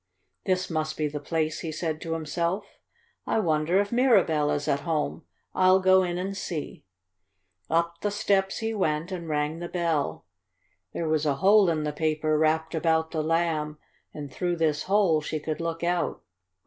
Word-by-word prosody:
"This 185 0 +1
must 155 -1 -2
be 155 - 0
the 150 0 -5
place," 155 +1 -1
he 160 - -4
said 155 0 -3
to 165 - -3
himself. 170 +5 -2 0.6
"I - - +1
wonder 165 -2 +2
if 205 0 0
Mirabell 200 - +3
is 145 0 -1
at 140 - +2
home. 160 0 -2 0.3
I'll 185 0 +5
go 190 0 +5
in 175 -1 -2
and 195 +2 -3
see." 165 - -5 0.8
Up 170 +1 0
the 205 - 0
steps 200 -2 +1
he 225 0 -2
went 165 -3 -1
and 170 -3 -5
rang 150 +1 -1
the 175 0 -5
bell. 165 -5 -1 0.7
There 165 - -3
was 155 -1 +1
a 140 - +2
hole 195 +4 +5
in 155 -2 0
the 150 -1 -2
paper 155 0 0
wrapped 160 +1 +1
about 160 0 +1
the 160 - -1
Lamb, 155 -1 0 0.3
and 145 -3 -8
through 175 +3 -1
this 155 -3 0
hole 195 -6 +3
she 155 +1 -3
could 155 +2 -4
look 165 0 -3
out. 175 0 -1
165 Hz, 175 wpm, -26 LUFS, 155-185 Hz, 0.8 s, I'll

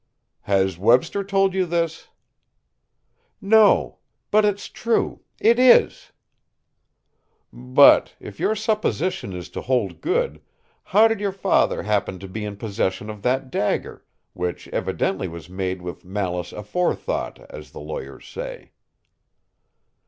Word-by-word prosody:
"Has 95 -3 +1
Webster 125 - +3
told 195 -1 +1
you 190 -1 0
this?" 165 -1 -2 1.3
"No 210 +1 +4 0.3
but 215 +1 +5
it's 205 -1 0
true; 230 0 -1 0.2
it 235 +2 +4
is!" 255 -1 +4 1.4
"But, 65 +1 +5
if 100 - -11
your 220 - +1
supposition 210 - -1
is 90 -1 -7
to - - -6
hold 125 -6 -1
good, 475 +8 -1 0.4
how 215 +4 +5
did 225 -2 -1
your 200 -1 -1
father 195 0 +1
happen 100 -3 -1
to 95 - -9
be 105 +3 -6
in 105 -1 -6
possession 105 -1 -2
of 105 -1 -11
that 130 +3 -1
dagger, 105 - -2 0.3
which 90 0 -4
evidently 95 0 -2
was 85 0 -10
made 95 -1 -4
with 90 -1 -7
malice 90 -2 -3
aforethought, 105 - -2
as - - -10
the - - -11
lawyers - - -8
say?" - - -8
125 Hz, 125 wpm, -22 LUFS, -, 1.4 s, but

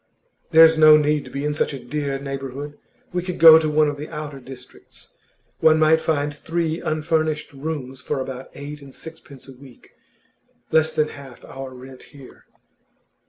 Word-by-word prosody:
'There's 160 0 +6
no 155 -1 +8
need 150 -1 0
to - - -11
be 140 +1 -5
in 150 - -1
such 150 - -1
a - - -8
dear 140 +2 -4
neighbourhood. 135 +1 -7 0.4
We 180 - -1
could 180 0 -5
go 160 0 +9
to 155 -1 -1
one 150 0 +3
of 145 -1 -3
the 150 +2 -8
outer 150 -3 -7
districts. 125 -1 -13 0.5
One 160 0 +5
might 160 0 +3
find 145 -2 -1
three 165 +1 -3
unfurnished 155 -1 -2
rooms 135 -3 -6
for 135 - -3
about 130 0 -7
eight 145 +1 -8
and 140 -1 -14
sixpence 155 -5 -12
a 135 - -11
week 130 -1 -17 0.8
less 160 0 +3
than 150 0 0
half 135 -4 -13
our 135 -1 -9
rent 130 +1 -12 0.2
here. 135 -2 -15
150 Hz, 170 wpm, -22 LUFS, 135-155 Hz, 0.8 s, go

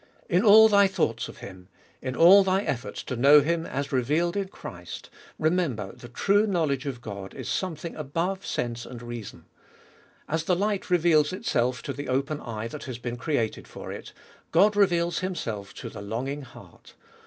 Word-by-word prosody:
In 180 -3 +3
all 220 0 +9
thy 200 -2 +5
thoughts 120 -11 -1
of - - -11
Him, 90 -1 -11 0.3
in 130 0 -4
all 190 +4 +8
thy 190 +1 +1
efforts 115 - -4
to 130 - -4
know 140 +5 +7
Him 165 +3 -1
as 140 +1 -3
revealed 150 +8 +1
in 200 -1 -1
Christ, 90 - -9 0.3
remember 155 - 0
the 120 - -12
true 205 - +2
knowledge 155 -7 0
of 130 -3 -5
God 100 -4 -8
is - - -7
something 170 -3 -3
above 165 +6 -2
sense 120 -1 -3
and 120 - -9
reason. 120 -3 -8 0.8
As 160 +1 -1
the 180 - +2
light 205 +1 -1
reveals 165 -4 +4
itself 125 - -1
to 140 - -4
the 145 -1 -6
open 140 +3 -1
eye 115 -2 -5
that 150 - -8
has 130 -4 -5
been 120 0 -5
created 120 -5 -2
for - - -8
it, - - -8 0.4
God 210 +1 +4
reveals 175 -5 +2
Himself 115 - -4
to - - -7
the - - -8
longing 125 +8 -4
heart. 125 -3 -15
145 Hz, 175 wpm, -26 LUFS, 120-180 Hz, 0.8 s, all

